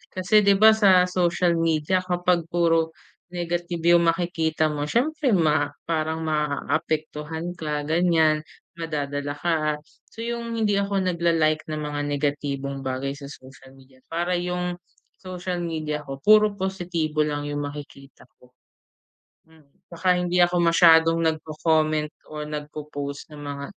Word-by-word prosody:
Kasi 185 +3 +4
di 200 0 +5
ba? 215 +3 +7
Sa 195 -4 +5
social 175 -1 +1
media 165 +2 +1
kapag 180 -2 0
puro 165 -1 +1 0.4
negative 175 -1 -3
yung 170 0 +2
makikita 165 -2 0
mo, 145 0 -3
siyempre 270 - +1
ma 155 -4 +2 0.2
parang 160 0 -1
maapektuhan 155 +1 -2
ka 150 -3 -3
ganyan, 160 -1 +2 0.4
madadala 145 -3 -3
ka. 165 +2 0 0.5
So 225 - -9
yung 235 0 -4
hindi 210 -3 +1
ako 200 -1 0
nag 180 -2 -2
la-like 160 -2 +1
ng 155 -1 -4
mga 150 -1 -4 0.2
negatibong 140 -1 -2
bagay 130 +1 -2
sa 140 -1 -9
social 135 -1 -14
media. 130 -1 -20
Para 175 +2 -1
yung 180 0 -3 0.4
social 180 -1 -5
media 155 -3 -3
ko 135 - -5
puro 215 -1 +5
positibo 175 -5 -3
lang 145 -1 -3
yung 145 0 -3
makikita 145 -1 -11
ko. 125 0 -23 1.0
Hmm 160 -2 -22 0.3
tsaka 180 +2 +2
hindi 180 0 0
ako 175 0 +3
masyadong 165 -1 +5
nagco-comment 155 -1 0 0.2
o 150 - -5
nag 150 0 -6
po-post 145 -2 -6
ng 150 -1 -11
mga 140 0 -5
160 Hz, 140 wpm, -24 LUFS, 150-180 Hz, 1.0 s, ba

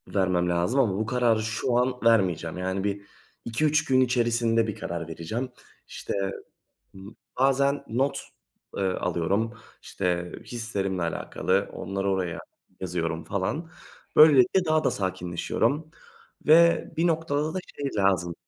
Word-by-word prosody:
vermem 90 -2 +2
lazım 90 +10 +1
ama 110 -8 +3
bu 110 - -1
kararı 115 -2 +2
şu 120 +2 -1
an 125 +1 +2
vermeyeceğim. 90 -7 +2
Yani, 95 +1 -2
1-2-3 115 +8 -2
gün 130 -1 +3
içerisinde 115 -2 +2
bir 105 - -3
karar 85 -1 -5
vereceğim. 95 +11 -4 0.4
İşte - - -6 1.3
bazen 140 +1 +2
not, 130 +5 0 0.6
ııı, 95 -2 -1
alıyorum, 100 +7 0 0.3
işte 90 -1 -2
hislerimle 100 -6 -3
alakalı, 85 - -1
onları 95 0 -3
oraya 90 -3 -1 0.4
yazıyorum 85 -2 -3
falan. 150 - -3 0.5
Böylelikle 155 +4 +6
daha 155 -1 +2
da - - +3
sakinleşiyorum. 95 - -2 0.6
Ve 170 +2 +6
bir 170 +2 +2
noktada 155 -1 0
da - - -1 0.2
şey 140 -1 -3
lazım 90 -4 +1
110 Hz, 120 wpm, -26 LUFS, 90-135 Hz, 1.3 s, Böylelikle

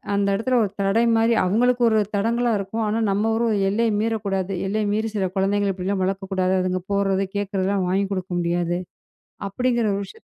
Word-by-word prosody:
அந்த 200 0 +1
இடத்துல 250 +5 +1
ஒரு 205 - -1
தடை 195 +4 +2
மாரி 225 +1 +3
அவங்களுக்கு 245 +6 +2
ஒரு 220 - +2 0.2
தடங்கலா 235 +4 +1
இருக்கும். 210 +4 -3
ஆனா, 220 +2 0
நம்ம 210 +3 +1
ஒரு 235 - +1 0.2
எல்லைய 225 +3 +1
மீறக் 225 -1 -1
கூடாது. 195 0 -1
எல்லைய 215 +2 -1
மீறி 220 +1 -1
சில 190 -2 0
குழந்தைகள 200 +1 +1
இப்படி 185 0 -5
எல்லாம் 195 -2 0
வளர்க்க 195 +1 -3
கூடாது. 185 0 +1
அதுங்க 185 0 -1
போறது, 195 -1 +1
கேக்குறது 200 -2 -1
எல்லாம் 195 -2 0
வாங்கி 195 +2 +1
கொடுக்க 185 -1 -5
முடியாது 175 0 0 0.7
அப்படிங்கற 240 +2 0
ஒரு 200 - -2
விஷயம். 450 - -15
200 Hz, 190 wpm, -23 LUFS, 190-225 Hz, 0.7 s, மாரி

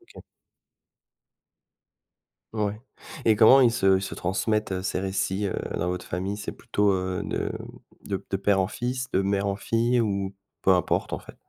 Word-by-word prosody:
OK. - - -11 2.3
Ouais. 105 -1 -1 0.5
Et 110 - +5
comment 120 +5 +7
ils 120 -3 +5
se 95 -4 +3
ils - - -4
se - - -5
transmettent 95 0 -1
ces 95 - -1
récits, 95 +1 -1
heu, 90 - -2 0.2
dans 85 - -1
votre 90 0 -3
famille? 95 +3 -3
C'est 105 - -5
plutôt, 100 0 0
heu, 95 -1 -2
de - - -2 0.5
de 100 -1 -3
de 95 - 0
père 100 0 +2
en 95 - +2
fils, 125 +4 -3
de 95 - +2
mère 100 0 0
en 100 - 0
fille 115 +4 +1
ou 100 -3 -1 0.3
peu - - +1
importe, 90 -1 +1
en - - -2
fait? - - -14
100 Hz, 170 wpm, -26 LUFS, 95-110 Hz, 2.3 s, comment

